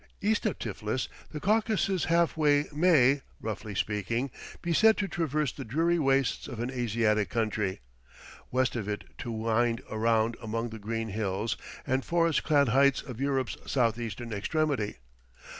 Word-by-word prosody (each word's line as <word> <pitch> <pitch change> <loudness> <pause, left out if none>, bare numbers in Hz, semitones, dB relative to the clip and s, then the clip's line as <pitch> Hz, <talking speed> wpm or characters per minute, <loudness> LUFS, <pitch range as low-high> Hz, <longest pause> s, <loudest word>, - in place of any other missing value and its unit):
East 215 +2 +1
of 210 - -2
Tiflis, 110 +3 -3 0.2
the 150 - -5
Caucasus 210 -1 +1
Hallway 155 -3 +3
may, 145 -4 +4 0.2
roughly 105 -1 -5
speaking, 115 +7 -1 0.3
be 170 -1 -1
said 220 +6 +5
to 205 - 0
traverse 155 -6 -1
the - - -7
dreary 165 +8 +1
wastes 135 -4 +1
of 120 - -7
an 120 +2 -2
Asiatic 110 -4 +1
country; 105 - -1 0.7
west 130 0 +1
of 110 -4 -3
it 105 - -3 0.2
to 120 - -4
wind 115 +2 0
around 115 +1 +1
among 115 +1 -2
the 110 0 -8
green 115 +2 -3
hills 105 +1 -1 0.3
and 130 0 0
forest 170 -2 +2
clad 145 -4 +3
heights 140 +2 +4
of 125 -3 -8
Europe's 135 -2 0
southeastern 115 -2 -1
extremity. 130 +1 -1
125 Hz, 145 wpm, -29 LUFS, 110-150 Hz, 0.7 s, said